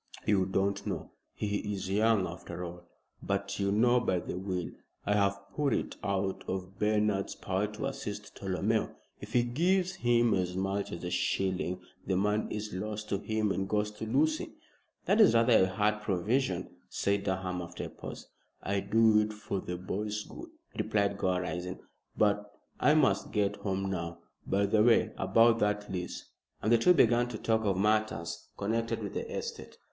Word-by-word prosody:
"You 95 -3 +3
don't 100 +1 0
know. - - -4 0.2
He 105 -1 -2 0.2
is 95 -1 -4
young 105 0 +3
after 85 0 -6
all. 85 0 -9 0.3
But 100 +1 -2
you 100 0 +1
know, 120 +4 +4
by 95 -6 +1
the - - -5
will, 90 -2 -3 0.3
I 105 - +2
have 100 -1 +2 0.2
put 145 -2 +1
it - - -3
out 95 -1 -1
of 95 0 -5
Bernard's 105 -2 +1
power 95 +2 -1
to 105 +5 -5
assist 105 -7 -5
Tolomeo. 100 +3 -1 0.2
If 105 +2 -10
he 120 - +4
gives 180 +9 +1
him 120 -1 +4
as 90 -1 0
much 95 +1 -1
as 85 - -6
a 90 - -3
shilling 95 -1 0 0.3
the 95 - +1
money 105 +3 0
is 105 -1 -5
lost 105 +3 -4
to 100 - 0
him 110 -1 0
and 95 0 -2
goes 105 0 +1
to 110 +1 -6
Lucy." 155 +7 +1 0.5
"That - - +4
is 115 - +7
rather 115 -4 +6
a - - -1
hard 105 +2 0
provision," 100 0 -1
said 100 0 0
Durham, 95 -2 -2
after 85 0 -6
a - - -5
pause. - - -9 0.4
"I 100 +1 0
do 110 +2 +4
it 105 0 0
for 105 -2 -4
the 90 - -4
boy's 105 +3 -3
good," 340 - -10 0.3
replied 100 -1 0
Gore, 90 -1 +1
rising; 90 +1 -4 0.4
"but 105 -1 +2 0.3
I 150 +4 +5
must 150 -4 +2
get 105 -1 +1
home 95 -1 -2
now. 85 -2 -3 0.3
By 100 +1 +2
the 105 +2 +3
way, 115 +1 +4
about 115 0 +4
that 105 -1 0
lease," 90 -2 -5 0.3
and 110 - 0
the 120 - +6
two 180 +9 +6
began 120 -3 +4
to 115 - -5
talk 110 0 +1
of 95 -2 +1
matters 100 -5 0
connected 115 +3 -1
with - - -5
the - - -4
estate. - - -6
105 Hz, 180 wpm, -31 LUFS, 95-110 Hz, 0.5 s, is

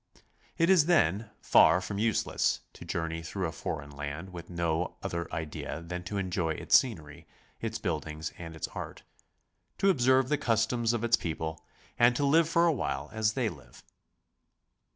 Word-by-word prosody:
It 165 +1 +4
is, 170 -5 +5
then, 105 - +2
far 85 - +6
from 100 +2 -5
useless 110 0 +1
to - - -11
journey 80 0 -3
through 95 +3 -3
a 80 - -2
foreign 70 -2 -5
land 75 +6 -6
with 85 -1 -9
no 85 -1 -1
other 85 -1 -3
idea 80 0 -4
than 90 +2 -6
to 100 +3 -4
enjoy 90 -4 -1
its - - +2
scenery, 80 - +1 0.3
its 115 0 -3
build 80 -7 -2
ings, 80 +1 -5
and 80 -1 -7
its 80 - -4
art, - - -7 0.7
to 195 - +4
observe 130 -3 +3
the 150 - +1
customs 115 +1 +1
of 120 -1 -2
its 120 0 +4
people, 80 -1 -4 0.4
and 120 +1 +5
to 145 - +1
live 160 +3 +4
for 170 0 +4
a 165 - +4
while 70 - -3
a5 110 -1 +1
they 125 -4 +1
live. 85 -8 -10
95 Hz, 175 wpm, -29 LUFS, 80-120 Hz, 0.7 s, far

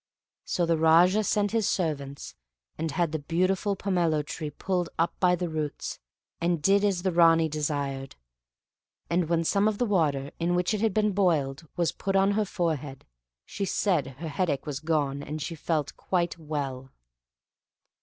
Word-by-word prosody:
So 175 - 0
the 165 -1 +2
Raja 175 +6 +5
sent 205 0 +1
his 225 -3 +1
servants, 140 -6 -3 0.4
and 160 +1 -3
had 165 +2 0
the 160 - -2
beautiful 185 +6 0
pomelo 170 -6 0
tree 155 0 -5
pulled 180 +3 -2
up 165 +1 +1
by 180 -1 +4
the 180 0 -3
roots, 155 -3 -4 0.4
and 170 0 +1
did 195 +6 +3
as 195 -4 +1
the 190 - +1
Ranee 165 -1 +5
desired; 145 -3 -3 1.0
and 170 -1 +1
when 165 -1 +2
some 200 +5 +2
of 215 -1 0
the 245 - +1
water, 150 - +1
in 175 +1 +1
which 180 +3 +1
it 210 - -1
had 225 -4 +1
been 210 -1 +3
boiled, 165 -6 0
was 170 -2 +2
put 195 0 -3
on 195 +1 +4
her 210 +1 +1
forehead, 155 -8 -3 0.4
she - - -5
said 180 -6 +1
her 165 +2 -5
headache 145 -2 -1
was 145 -3 -4
gone 150 -3 0
and 150 +2 -5
she 160 +3 -4
felt 155 -2 -2
quite 175 -2 -1
well. 140 -4 -4
165 Hz, 170 wpm, -27 LUFS, 150-185 Hz, 1.0 s, Raja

